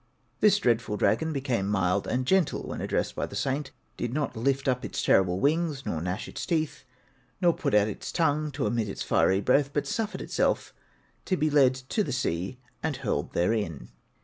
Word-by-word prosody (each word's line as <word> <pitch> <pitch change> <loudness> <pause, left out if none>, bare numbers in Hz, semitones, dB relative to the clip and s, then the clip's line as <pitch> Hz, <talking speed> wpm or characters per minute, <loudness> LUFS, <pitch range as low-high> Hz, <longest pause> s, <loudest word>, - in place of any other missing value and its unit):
This 205 -2 +5
dreadful 115 - +1
dragon 160 +8 +2
became 130 -9 -1
mild 95 -1 +1
and 125 +1 0
gentle 185 0 +2
when - - -5
addressed - - -1
by - - -2
the - - -9
saint; 135 +1 -1 0.3
did 120 - -2
not 150 -1 -1
lift 135 +4 0
up 125 -1 +1
its - - -3
terrible 95 -1 +3
wings, 150 0 +1
nor 80 - -2
gnash 90 +6 -3
its - - -6
teeth, 160 -5 -1 0.6
nor 175 -2 +4
put - - -1
out 105 0 +5
its 105 - -5
tongue 155 -2 +1
to 140 +1 -1
emit 115 -3 0
its - - -4
fiery 95 +1 +3
breath, 140 +6 +3
but 145 - -1
suffered 220 -2 -2
itself - - 0 0.5
to 185 - 0
be 155 -1 +1
led 135 -3 +5
to 130 - -2
the 145 - -4
sea 95 -3 -2 0.2
and 160 -3 -1
hurled 105 - -2
therein. 85 - -1
130 Hz, 190 wpm, -27 LUFS, 105-150 Hz, 0.6 s, This